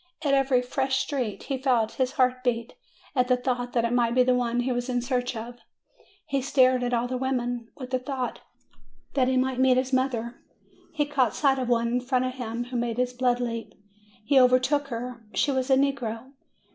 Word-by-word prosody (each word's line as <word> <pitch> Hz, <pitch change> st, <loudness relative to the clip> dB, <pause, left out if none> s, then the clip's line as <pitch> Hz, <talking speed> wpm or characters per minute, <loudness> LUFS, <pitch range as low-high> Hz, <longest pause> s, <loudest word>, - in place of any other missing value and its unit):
At 285 Hz, -2 st, +2 dB
every 270 Hz, -2 st, +3 dB
fresh 265 Hz, +1 st, -1 dB
street, 265 Hz, -6 st, -2 dB
he 270 Hz, -2 st, -3 dB
felt 240 Hz, -5 st, +2 dB
his 260 Hz, -1 st, -1 dB
he'art 255 Hz, -1 st, +1 dB
beat, 235 Hz, -2 st, -1 dB, 0.4 s
at 250 Hz, -1 st, +2 dB
the 250 Hz, 0 st, +3 dB
thought 245 Hz, -1 st, -2 dB
that 235 Hz, -1 st, +2 dB
it 235 Hz, -, -1 dB
might 235 Hz, -1 st, +2 dB
be 255 Hz, -, +6 dB
the 255 Hz, 0 st, +3 dB
one 245 Hz, -1 st, 0 dB
he 255 Hz, +1 st, -1 dB
was 245 Hz, +1 st, -2 dB
in 245 Hz, -1 st, +1 dB
search 250 Hz, 0 st, -2 dB
of. 240 Hz, +2 st, -8 dB, 0.7 s
He 275 Hz, 0 st, -1 dB
stared 255 Hz, -1 st, +3 dB
at 245 Hz, 0 st, -1 dB
all 240 Hz, 0 st, +1 dB
the 250 Hz, 0 st, -3 dB
women, 245 Hz, -3 st, -2 dB
with 255 Hz, -2 st, -8 dB
the 255 Hz, -, +1 dB
thought 255 Hz, -1 st, -4 dB, 0.7 s
that 260 Hz, -3 st, +2 dB
he 260 Hz, 0 st, +2 dB
might 255 Hz, 0 st, 0 dB
meet 260 Hz, -1 st, +4 dB
his 260 Hz, +1 st, -1 dB
mother. 245 Hz, -2 st, -1 dB, 0.5 s
He 295 Hz, -1 st, +1 dB
caught 270 Hz, -6 st, +1 dB
sight 270 Hz, -2 st, +2 dB
of 250 Hz, -1 st, -2 dB
one 235 Hz, -1 st, +2 dB
in 250 Hz, +1 st, 0 dB
front 255 Hz, 0 st, 0 dB
of 255 Hz, -, -3 dB
him 240 Hz, -2 st, -4 dB
who 245 Hz, 0 st, -5 dB
made 235 Hz, -1 st, -2 dB
his 250 Hz, 0 st, 0 dB
blood 245 Hz, -1 st, +1 dB
leap; 230 Hz, -2 st, -4 dB, 0.5 s
he 275 Hz, +1 st, +5 dB
overtook 255 Hz, +3 st, +3 dB
her: 240 Hz, -1 st, -6 dB
she 290 Hz, -, +2 dB
was 260 Hz, 0 st, -1 dB
a 265 Hz, -, +6 dB
negro. 260 Hz, -3 st, -1 dB
250 Hz, 210 wpm, -26 LUFS, 245-265 Hz, 0.7 s, be